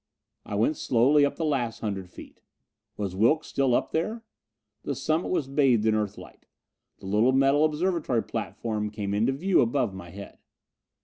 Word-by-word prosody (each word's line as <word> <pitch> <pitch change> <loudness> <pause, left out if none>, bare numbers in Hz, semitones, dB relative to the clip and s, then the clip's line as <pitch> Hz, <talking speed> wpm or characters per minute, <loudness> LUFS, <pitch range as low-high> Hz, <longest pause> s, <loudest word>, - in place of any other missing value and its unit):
I 100 - -4
went 115 +9 +1
slowly 135 +5 +3
up 145 - +1
the 165 - -2
last 125 -7 -1
hundred 95 -4 -4
feet. - - -13 0.6
Was 100 -3 -3
Wilks 120 +11 +2
still 135 -3 +1
up - - -1
there? 215 +8 -2 0.6
The 140 - -3
summit 155 +6 -1
was 155 -7 -1
bathed 135 -6 +2
in 110 - +3
Earthlight. 105 -2 -5 0.5
The - - -14
little 105 +6 +2
metal 135 +2 +4
observatory 155 -6 0
platform 110 -1 -4
came 105 -2 -4
into 110 +5 +2
view 175 +8 +2
above 115 -3 0
my 90 -2 -9
head. 100 +2 -11
120 Hz, 165 wpm, -26 LUFS, 105-150 Hz, 0.6 s, metal